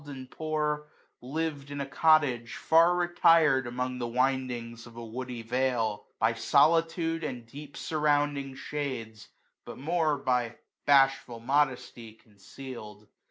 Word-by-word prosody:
And 130 -2 -9
poor, 150 -1 -2 0.3
liv'd 145 +1 -4
in 145 - -6
ft 140 -1 -5
cottage, 135 -6 +3
far 165 +2 +4
retired 165 -6 +4
Among 125 +1 -3
the 120 - -2
windings 125 -2 -2
of 115 - -15
a 120 - -7
woody 120 +1 -6
vale, 120 -3 -1
By 110 +1 +2
solitude 165 +7 +2
and 125 -5 -5
deep 140 +4 -11
surrounding 145 -3 0
shades^ 125 -8 -5 0.4
But - - -9
more 155 +1 0
byjbashful 125 0 +1
modesty, 125 -5 -1
conceaFd. 105 0 -11
135 Hz, 115 wpm, -28 LUFS, 120-150 Hz, 0.4 s, far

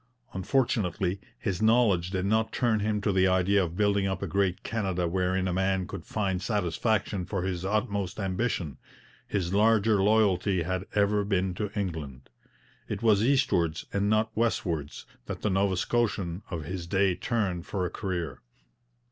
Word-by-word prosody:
Unfortunately, 95 -3 0 0.2
his 95 -3 -3
knowledge 110 -6 +3
did 95 -1 -2
not 110 +2 +1
turn 115 -4 +1
him 105 0 0
to 105 - +1
the 95 0 +3
idea 95 +2 +3
of 85 0 -5
building 100 -1 +2
up 95 0 -2
a - - -2
great 95 +2 0
Canada 95 -6 -1
wherein 95 +1 0
a 90 - -1
man 95 0 +1
could 95 -3 -7
find 95 -4 -1
satisfaction 100 0 0
for 95 0 -3
his 90 -1 -2
utmost 100 -1 -1
ambition; 95 - -2 0.5
his 95 -3 -1
larger 110 0 +4
loyalty 100 -3 +3
had 95 +3 -3
ever 105 0 +3
been 95 -2 0
to 105 +3 -3
England. 75 -10 -5 0.6
It - - -4
was 105 -3 +4
eastwards 115 - +2
and 100 +1 +1
not 110 +1 +1
westwards 85 -10 -1 0.2
that - - -6
the 105 - +1
Nova 95 -1 +1
Scotian 100 -4 0
of 85 -4 -4
his 85 +2 -5
day 95 +1 +2
turned 90 -2 -2
for 95 -3 -2
a 85 - -3
career. 85 - -4
95 Hz, 160 wpm, -28 LUFS, 90-105 Hz, 0.6 s, larger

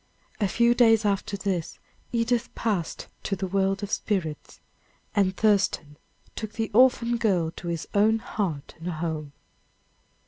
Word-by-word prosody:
A 205 - +2
few 235 +4 +3
days 225 -3 +5
after 200 0 0
this 190 -4 -2 0.3
Edith 235 +1 +1
passed 200 -8 -2 0.2
to 195 - -2
the 190 - -3
world 195 +1 0
of 205 - -4
spirits. 165 -8 -2 0.6
And 195 -2 +2
Thurston 200 -8 +2 0.4
took 215 -1 -5
the 225 -1 -2
orphan 240 0 +4
child 180 -8 +1
to 175 - -7
his 170 -2 -3
own 215 +2 +4
heart 185 -10 -3
and 165 - -7
home. 155 -3 -4
200 Hz, 140 wpm, -26 LUFS, 175-225 Hz, 0.6 s, days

